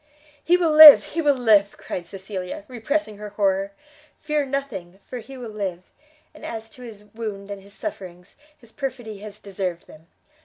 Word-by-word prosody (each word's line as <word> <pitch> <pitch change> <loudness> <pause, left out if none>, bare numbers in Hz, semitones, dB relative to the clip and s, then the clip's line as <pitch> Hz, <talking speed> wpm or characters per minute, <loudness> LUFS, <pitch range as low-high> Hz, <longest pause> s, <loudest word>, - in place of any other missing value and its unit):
"He 350 +1 +4
will 340 -3 +1
live, 305 -1 +11
he 330 - 0
will 290 -3 +2
live!" 210 -5 +3
cried 175 -1 -6
Cecilia, 190 0 -7
repressing 245 -2 -3
her 210 0 -7
horror, 195 -1 0 0.5
"fear 300 -2 -1
nothing, 210 -10 -5
for 250 - -7
he 265 +4 -11
will 240 -3 -8
live; 190 -4 -4 0.5
and 310 - -16
as 225 -1 -7
to 250 - -16
his 220 -4 -11
wound 205 -3 -6
and 200 -1 -7
his 200 +1 -16
sufferings, 185 - -8 0.2
his 235 -2 -18
perfidy 240 -7 -6
has 210 0 -10
deserved 190 -4 -5
them. 155 +2 -17
215 Hz, 170 wpm, -23 LUFS, 195-260 Hz, 0.5 s, live